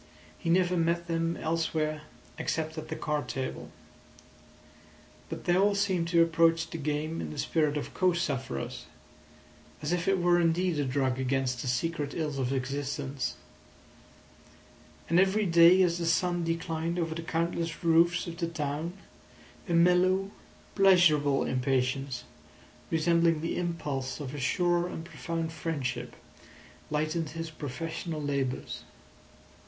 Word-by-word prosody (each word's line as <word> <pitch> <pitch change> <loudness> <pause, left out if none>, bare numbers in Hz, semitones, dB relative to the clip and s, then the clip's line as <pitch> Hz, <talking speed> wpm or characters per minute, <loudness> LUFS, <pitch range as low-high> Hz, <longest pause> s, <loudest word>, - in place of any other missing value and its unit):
He 165 - -4
never 180 +1 +3
met 170 0 +1
them 165 0 -1
elsewhere 155 -1 -1 0.4
except 160 -1 -2
at 155 -1 -6
the 160 - -4
card 150 -2 -2
table. 130 -1 -4 1.6
But - - -6
they 175 - +3
all 200 +2 +3
seemed 190 -4 +1
to 170 0 +5
approach 165 0 +2
the 165 - -5
game 150 +2 -2
in 80 - -4
the 75 - -8
spirit 150 -2 +1
of 150 - -5
co 185 -1 +3
sufferers, 135 - -3 0.9
as 150 +2 -3
if 175 0 0
it 195 0 +3
were 175 -1 +3
indeed 170 0 +1
a 145 - +1
drug 130 -1 0
against 130 -1 0
the - - -5
secret 145 +3 -1
ills 150 -4 -2
of 130 -1 0
existence; 135 +1 -2 1.7
and 170 +2 +4
every 195 +3 +3
day 170 +1 +7
as 175 -1 +1
the 170 - -1
sun 175 +1 +1
declined 165 0 -2
over 165 -2 -1
the 165 - -5
countless 165 0 -2
roofs 170 +1 +4
of 170 -1 -7
the 170 -1 -1
town, 155 +1 -3 0.8
a - - +1
mellow, 185 +3 +4 0.4
pleasurable 165 -8 +5
impatience, 130 0 -1 0.7
resembling 165 0 +3
the 165 - -2
impulse 145 -7 -3
of 140 -2 -6
a 145 - -5
sure 175 +6 +1
and 165 -2 -6
profound 165 +1 -4
friendship, 130 -7 -3 0.7
lightened 155 +1 -1
his 165 +1 -6
professional 160 +3 -5
labours. 140 -3 -2
165 Hz, 135 wpm, -29 LUFS, 145-170 Hz, 1.7 s, day